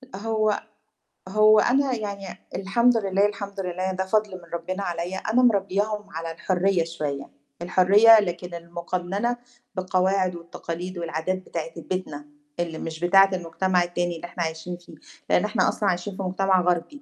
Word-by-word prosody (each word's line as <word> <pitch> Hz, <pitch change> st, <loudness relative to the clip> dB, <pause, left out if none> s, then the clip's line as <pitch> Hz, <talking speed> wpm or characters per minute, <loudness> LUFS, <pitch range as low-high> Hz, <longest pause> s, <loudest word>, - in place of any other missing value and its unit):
هو، 215 Hz, 0 st, 0 dB, 0.7 s
هو 215 Hz, +2 st, +6 dB
أنا 260 Hz, +3 st, +2 dB
يعني 200 Hz, -3 st, -5 dB, 0.3 s
الحمد 235 Hz, +5 st, +3 dB
لله 195 Hz, -2 st, +2 dB
الحمد 200 Hz, -1 st, -4 dB
لله 185 Hz, 0 st, -2 dB
ده 190 Hz, 0 st, -2 dB
فضل 210 Hz, +1 st, +1 dB
من -, -, -15 dB
ربنا 185 Hz, +3 st, -3 dB
عليَّ، 175 Hz, 0 st, -3 dB
أنا 220 Hz, +6 st, +1 dB
مربّياهم 210 Hz, -1 st, +1 dB
على 165 Hz, +1 st, -5 dB
الحرّية 180 Hz, +1 st, +1 dB
شوية، 150 Hz, -4 st, -5 dB, 0.3 s
الحرّية 200 Hz, +5 st, +6 dB
لكن 175 Hz, -2 st, -3 dB
المقنَّنة 175 Hz, +7 st, -3 dB, 0.4 s
بقواعد 185 Hz, 0 st, +1 dB
والتقاليد 170 Hz, +1 st, -6 dB
والعادات 170 Hz, +2 st, -2 dB
بتاعة 165 Hz, -3 st, -6 dB
ال -, -, -6 dB
بيتنا 155 Hz, -6 st, -4 dB, 0.3 s
اللي 165 Hz, -2 st, -2 dB
مش 160 Hz, -1 st, -6 dB
بتاعة 195 Hz, +3 st, +6 dB
المجتمع 180 Hz, +1 st, +1 dB
التاني 175 Hz, 0 st, -2 dB
اللي 165 Hz, +1 st, -7 dB
إحنا 175 Hz, 0 st, -3 dB
عايشين 160 Hz, +2 st, -4 dB
فيه، 175 Hz, -, -15 dB, 0.3 s
لإن -, -, +3 dB
إحنا -, -, +2 dB
أصلًا 205 Hz, -, 0 dB
عايشين 185 Hz, +2 st, -3 dB
في 195 Hz, -, -3 dB
مجتمع 185 Hz, 0 st, +2 dB
غربي. 180 Hz, -, -1 dB
185 Hz, 150 wpm, -25 LUFS, 175-200 Hz, 0.7 s, هو